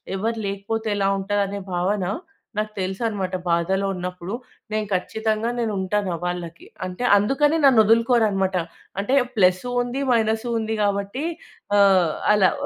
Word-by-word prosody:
ఎవరు 225 Hz, +4 st, -1 dB
లేకపోతే 205 Hz, +3 st, -3 dB
ఎలా 195 Hz, -1 st, +1 dB
ఉంటదనే 200 Hz, 0 st, -1 dB
భావన 185 Hz, +3 st, 0 dB, 0.6 s
నాకు 215 Hz, 0 st, -2 dB
తెలుసనమాట. 190 Hz, 0 st, -2 dB, 0.2 s
బాధలో 190 Hz, +4 st, +1 dB
ఉన్నప్పుడు 180 Hz, +3 st, -5 dB, 0.4 s
నేను 215 Hz, -1 st, -1 dB
ఖచ్చితంగా 220 Hz, +4 st, -1 dB
నేనుంటాను 205 Hz, -3 st, -1 dB
ఆహ్, 165 Hz, -, -15 dB
వాళ్ళకి. 175 Hz, -1 st, -5 dB, 0.2 s
అంటే 185 Hz, +7 st, -4 dB
అందుకని 290 Hz, +9 st, +2 dB
నన్నదులుకోరనమాట. 220 Hz, -5 st, +4 dB, 0.5 s
అంటే 255 Hz, +7 st, +1 dB, 0.2 s
ప్లస్సు 185 Hz, +5 st, +3 dB
ఉంది, 245 Hz, +3 st, -3 dB
మైనస్సు 220 Hz, +1 st, +1 dB
ఉంది. 220 Hz, 0 st, -2 dB
కాబట్టి 200 Hz, +7 st, -1 dB, 0.5 s
ఆహ్, 190 Hz, -5 st, +5 dB, 0.2 s
అలా. 195 Hz, -3 st, +4 dB
205 Hz, 120 wpm, -23 LUFS, 190-225 Hz, 0.6 s, ఆహ్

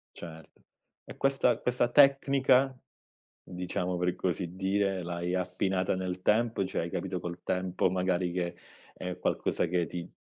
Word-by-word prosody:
Certo. 80 Hz, -2 st, -11 dB, 0.4 s
E -, -, -10 dB
questa 135 Hz, 0 st, +2 dB
questa 125 Hz, -1 st, +1 dB
tecnica, 135 Hz, -1 st, +4 dB, 0.7 s
diciamo 90 Hz, 0 st, -3 dB
per 90 Hz, 0 st, 0 dB
così 90 Hz, -1 st, -2 dB
dire, 95 Hz, 0 st, 0 dB
l'hai 85 Hz, +1 st, -3 dB
affinata 95 Hz, +1 st, 0 dB
nel 90 Hz, 0 st, -4 dB
tempo, 110 Hz, -1 st, +2 dB
cioè 95 Hz, -, -2 dB
hai 85 Hz, -, -4 dB
capito 90 Hz, 0 st, -3 dB
col 85 Hz, 0 st, -6 dB
tempo 90 Hz, 0 st, 0 dB
magari 90 Hz, -1 st, 0 dB
che 85 Hz, -1 st, -2 dB, 0.4 s
è 90 Hz, 0 st, -5 dB
qualcosa -, -, 0 dB
che 85 Hz, 0 st, 0 dB
ti 85 Hz, +2 st, -6 dB
90 Hz, 140 wpm, -30 LUFS, 90-100 Hz, 0.7 s, tecnica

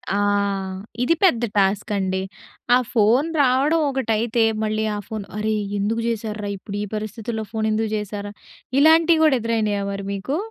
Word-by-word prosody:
ఆ! -, -, +1 dB, 0.9 s
ఇది 335 Hz, +6 st, +3 dB
పెద్ద 245 Hz, -11 st, +4 dB
టాస్కండి. 195 Hz, -1 st, +1 dB, 0.5 s
ఆ -, -, +6 dB, 0.2 s
ఫోన్ 235 Hz, +7 st, +3 dB
రావడం 275 Hz, +5 st, +3 dB
ఒకటైతే, 235 Hz, -3 st, 0 dB, 0.2 s
మళ్ళీ 215 Hz, 0 st, -1 dB
ఆ -, -, -3 dB
ఫోన్ 215 Hz, -3 st, -5 dB
అరే! 215 Hz, 0 st, 0 dB, 0.2 s
ఎందుకు 225 Hz, +3 st, 0 dB
జేసార్రా, 215 Hz, -2 st, -3 dB
ఇప్పుడు 200 Hz, +1 st, -7 dB
ఈ -, -, -2 dB
పరిస్థితుల్లో 220 Hz, +1 st, -4 dB
ఫోనేందుకు 220 Hz, 0 st, 0 dB
జేసార్ర, 205 Hz, -1 st, -5 dB, 0.5 s
ఇలాంటియి 320 Hz, +2 st, +5 dB
గూడా 285 Hz, -5 st, +5 dB
ఎదురైనాయా 215 Hz, -3 st, 0 dB
మరి 195 Hz, 0 st, -5 dB
మీకు? 235 Hz, +10 st, -3 dB
220 Hz, 135 wpm, -22 LUFS, 205-250 Hz, 0.9 s, ఆ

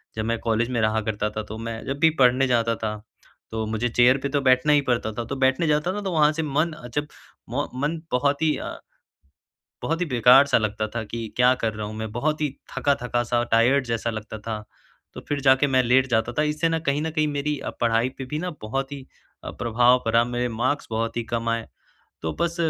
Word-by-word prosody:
जब 110 Hz, 0 st, -2 dB
मैं 115 Hz, +1 st, 0 dB
कॉलेज 115 Hz, +1 st, 0 dB
में 120 Hz, -, 0 dB
रहा 110 Hz, 0 st, +1 dB
करता 105 Hz, -1 st, -2 dB
था, 110 Hz, +1 st, -5 dB
तो 110 Hz, +1 st, -8 dB
मैं 115 Hz, 0 st, -5 dB
जब 135 Hz, +1 st, -3 dB
भी 160 Hz, +1 st, +6 dB
पढ़ने 130 Hz, +1 st, +4 dB
जाता 115 Hz, -2 st, +1 dB
था, 110 Hz, -1 st, -3 dB, 0.6 s
तो 110 Hz, 0 st, -2 dB
मुझे 110 Hz, +3 st, -1 dB
चेयर 125 Hz, +3 st, +4 dB
पे 140 Hz, -, -1 dB
तो 145 Hz, +1 st, 0 dB
बैठना 130 Hz, +2 st, +4 dB
ही 145 Hz, -, +4 dB
पड़ता 115 Hz, -2 st, 0 dB
था, 120 Hz, -, -3 dB
तो 140 Hz, -, -4 dB
बैठने 130 Hz, +5 st, +2 dB
जाता 150 Hz, +4 st, +1 dB
था 205 Hz, -, -4 dB
तो 195 Hz, -2 st, -3 dB
वहाँ 155 Hz, -3 st, +4 dB
से 160 Hz, +1 st, -2 dB
मन 155 Hz, +3 st, 0 dB
अ, 140 Hz, -6 st, -10 dB
जब 145 Hz, 0 st, -1 dB, 0.4 s
म 140 Hz, +4 st, -1 dB, 0.2 s
मन 160 Hz, +2 st, -1 dB
बहुत 140 Hz, +3 st, +1 dB
ही 155 Hz, -1 st, +3 dB
अ -, -, -6 dB, 1.1 s
बहुत 165 Hz, +1 st, -1 dB
ही 180 Hz, -, 0 dB
बेकार-सा 130 Hz, +1 st, +5 dB
लगता 110 Hz, 0 st, -2 dB
था 115 Hz, -, -2 dB
कि 115 Hz, -1 st, -4 dB
क्या 125 Hz, +1 st, +5 dB
कर 115 Hz, -3 st, -2 dB
रहा 105 Hz, 0 st, -4 dB
हूँ 105 Hz, -, -7 dB
मैं 110 Hz, 0 st, -4 dB
बहुत 150 Hz, +7 st, -1 dB
ही 150 Hz, -, +1 dB, 0.3 s
थका-थका-सा 120 Hz, -3 st, 0 dB
टायर्ड 125 Hz, +5 st, +4 dB
जैसा 115 Hz, 0 st, -1 dB
लगता 110 Hz, 0 st, -6 dB
था, 105 Hz, 0 st, -5 dB, 0.5 s
तो -, -, -7 dB
फिर 145 Hz, -1 st, -1 dB
जाके 130 Hz, +1 st, +4 dB
मैं 130 Hz, -2 st, +3 dB
लेट 130 Hz, +2 st, +3 dB
जाता 110 Hz, -1 st, +1 dB
था। -, -, +4 dB
इससे 150 Hz, +2 st, 0 dB
न 165 Hz, 0 st, 0 dB
कहीं 140 Hz, +2 st, +1 dB
न 160 Hz, -, -2 dB
कहीं 155 Hz, -1 st, +1 dB
मेरी 145 Hz, 0 st, -2 dB
अ, -, -, -5 dB
पढ़ाई 115 Hz, +1 st, +2 dB
पर 135 Hz, -, -4 dB
भी 150 Hz, -, -2 dB
ना 180 Hz, +3 st, -3 dB
बहुत 135 Hz, +6 st, -3 dB
ही 135 Hz, -2 st, -8 dB, 0.4 s
अ, -, -, -5 dB
प्रभाव 120 Hz, +2 st, +3 dB
पड़ा 115 Hz, +1 st, +3 dB
मेरे 120 Hz, 0 st, -2 dB
मार्क्स 130 Hz, +6 st, -1 dB
बहुत 115 Hz, +1 st, -2 dB
ही 120 Hz, -, 0 dB
कम 115 Hz, 0 st, -1 dB
आए। 115 Hz, -1 st, -2 dB, 0.6 s
तो 80 Hz, -, -2 dB
बस 170 Hz, 0 st, 0 dB
125 Hz, 230 wpm, -24 LUFS, 115-145 Hz, 1.1 s, भी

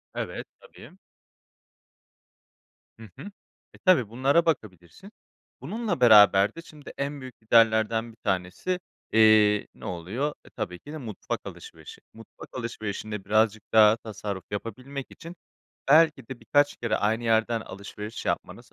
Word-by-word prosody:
Evet, -, -, -5 dB
tabii. -, -, -15 dB, 2.1 s
Hı 110 Hz, -, -12 dB
hı. 205 Hz, -, -9 dB, 0.4 s
E, -, -, -16 dB
tabii, 160 Hz, -, +4 dB
bunlara 135 Hz, +8 st, +2 dB
bakabilirsin. 110 Hz, -, -4 dB, 0.5 s
Bununla 220 Hz, -6 st, -3 dB
beraber 105 Hz, -4 st, +6 dB
de 165 Hz, -, -8 dB
şimdi 150 Hz, -3 st, -13 dB
en 140 Hz, 0 st, -4 dB
büyük 130 Hz, -3 st, -11 dB
giderlerden 110 Hz, 0 st, +3 dB
bir 110 Hz, -, -21 dB
tanesi, 95 Hz, -, -2 dB, 0.3 s
eee, 110 Hz, -2 st, +5 dB
ne -, -, -12 dB
oluyor? 100 Hz, -, -3 dB
E, -, -, -16 dB
tabii 90 Hz, 0 st, -6 dB
ki 145 Hz, -, -12 dB
de -, -, -5 dB
mutfak 115 Hz, -8 st, -5 dB
alışverişi. -, -, -11 dB
Mutfak 115 Hz, 0 st, -14 dB
alışverişinde 110 Hz, -4 st, -5 dB
birazcık 110 Hz, +1 st, +2 dB
daha 110 Hz, 0 st, +6 dB
tasarruf 100 Hz, -4 st, -6 dB
yapabilmek 130 Hz, +6 st, -6 dB
için 170 Hz, +2 st, -11 dB, 0.5 s
belki 155 Hz, -4 st, +4 dB
de 130 Hz, -2 st, -8 dB
birkaç 145 Hz, 0 st, +2 dB
kere 115 Hz, -2 st, -1 dB
aynı 110 Hz, +3 st, 0 dB
yerden 115 Hz, 0 st, +1 dB
alışveriş 105 Hz, +2 st, -8 dB
yapmanız -, -, -4 dB
115 Hz, 130 wpm, -26 LUFS, 105-140 Hz, 2.1 s, beraber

